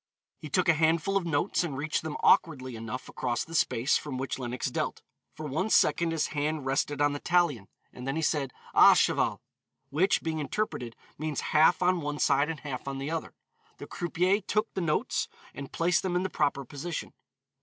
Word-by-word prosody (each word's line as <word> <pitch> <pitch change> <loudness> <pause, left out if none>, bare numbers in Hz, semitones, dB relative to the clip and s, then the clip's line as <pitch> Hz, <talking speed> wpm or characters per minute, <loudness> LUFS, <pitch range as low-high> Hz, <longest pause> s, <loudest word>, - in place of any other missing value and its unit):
He 155 - -8
took 180 +5 +1
a 165 - +6
handful 160 +4 +2
of 190 -3 +1
notes 165 +4 +1
and 145 -6 -4
reached 150 +3 -1
them 160 -1 -5
awkwardly 130 -6 +3
enough 115 +3 -6
across 120 -2 -2
the 165 - -11
space 130 -4 +2
from 140 -4 -5
which 135 +1 -3
Lenox 125 -1 -3
dealt; - - -3 0.3
for 155 - -7
one 160 +9 -1
second 170 -5 +3
his 160 -2 0
hand 150 -1 -2
rested 140 +2 0
on 145 0 +3
the 145 - -4
talion, 170 - +1 0.3
then 135 +2 -4
he 160 - -1
said, 140 -3 0 0.2
"À - - +8
cheval." - - +1 0.5
Which, 180 +7 +2
being 160 -1 -2
interpreted, 145 - -3 0.2
means 155 -2 -2
half 160 +4 +5
on 180 -1 +2
one 145 0 -3
side 140 +1 +2
and 160 -2 -5
half 135 -2 -6
on 135 0 -3
the 140 +3 -4
other. 165 -1 -4 0.4
The - - -8
croupier 180 +4 0
took 215 +3 -1
the 190 - -2
notes, 155 -3 0 0.3
and 140 -1 -8
placed 170 0 +2
them 185 -2 -2
in 180 - +1
the 190 - -3
proper 140 -3 0
position. 145 +6 -6
150 Hz, 195 wpm, -28 LUFS, 135-170 Hz, 0.5 s, À